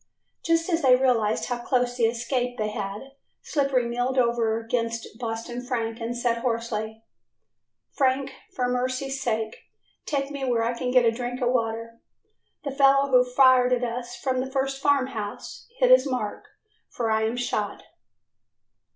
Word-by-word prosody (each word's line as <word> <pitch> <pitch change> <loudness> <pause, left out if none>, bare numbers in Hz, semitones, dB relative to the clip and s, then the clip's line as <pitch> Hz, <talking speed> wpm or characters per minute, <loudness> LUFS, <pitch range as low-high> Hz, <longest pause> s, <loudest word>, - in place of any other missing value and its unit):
Just 330 0 +2
as 340 -2 +1
they 255 -2 +6
realized 240 -5 +1
how 245 -1 -3
close 245 0 0
an 230 - +4
escape 245 +2 -1
they 215 -2 -1
had, 210 +4 -5 0.3
Slippery 275 -4 +1
keeled 245 +2 -1
over 235 -2 +2
against 230 0 -2
Boston 230 +1 -4
Frank 230 -3 -3
and 235 +1 -3
said 240 -1 0
hoarsely: 225 -2 -3 0.9
"Frank, 265 0 +1 0.2
for 250 -1 -1
mercy's 255 +2 -2
sake 220 -3 -2 0.5
take 280 -1 -1
me 280 -1 -5
where 240 -3 +1
I 235 +1 0
can 250 +1 -3
get 250 -1 +4
a 230 - +5
drink 245 +1 -4
of 245 -2 +1
water. 230 -1 -2 0.6
The 280 - -3
fellow 275 0 +4
who 250 -1 +6
fired 250 0 +5
at 250 0 0
us 240 0 -4
from 255 +1 -1
the 260 +1 -2
first 270 0 -1
farm 285 -2 +3
house 215 -5 -7
hit - - +4
his - - +6
mark, 255 - -3 0.4
for 230 -2 -2
I 220 0 +2
am 225 +2 -2
shot." 215 -4 -2
245 Hz, 160 wpm, -25 LUFS, 230-265 Hz, 0.9 s, they